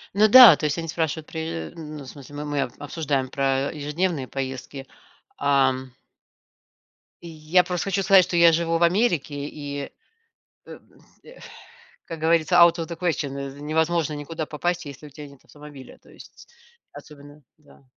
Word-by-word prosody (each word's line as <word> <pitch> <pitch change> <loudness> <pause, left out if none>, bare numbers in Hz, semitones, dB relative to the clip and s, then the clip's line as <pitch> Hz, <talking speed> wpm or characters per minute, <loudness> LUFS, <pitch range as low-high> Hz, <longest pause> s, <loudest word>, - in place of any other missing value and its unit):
Ну 210 +2 +5
да, 240 -5 +10
то - - -4
есть 150 +1 -1
они 165 -1 -5
спрашивают, 160 -1 -3
при 160 - -6
ну 155 -3 -9
в 130 - -13
смысле, 145 +1 -12
мы 150 +1 -6
мы 145 -1 -2
обсуждаем 140 0 -3
про 135 0 -1
ежедневные 150 0 -3
поездки, 135 +1 -7 0.5
ам 130 -2 +1 1.3
И 170 - -9
я 160 +3 +1
просто 180 0 -4
хочу 195 0 -1
сказать, 190 -1 +5
что 175 - -5
я 170 -1 +6
живу 165 0 0
в 170 - 0
Америке 170 - 0
и 145 -2 -7
э, - - -9 0.8
м, - - -16 0.2
э. - - -16 0.7
Как 165 - -8
говорится 165 +1 +2
out 170 -1 +6
of 165 - -3
the 170 -1 -8
question 160 -5 -1 0.3
невозможно 160 +1 -1
никуда 155 +2 -6
попасть, 175 +3 -3
если 140 +1 -11
у - - -14
тебя 150 +2 -11
нет 140 -2 -19
автомобиля, 145 -3 -14
то - - -22
есть - - -16 0.4
особенно, 145 0 -14
да. 150 -2 -22
155 Hz, 165 wpm, -23 LUFS, 140-170 Hz, 1.3 s, да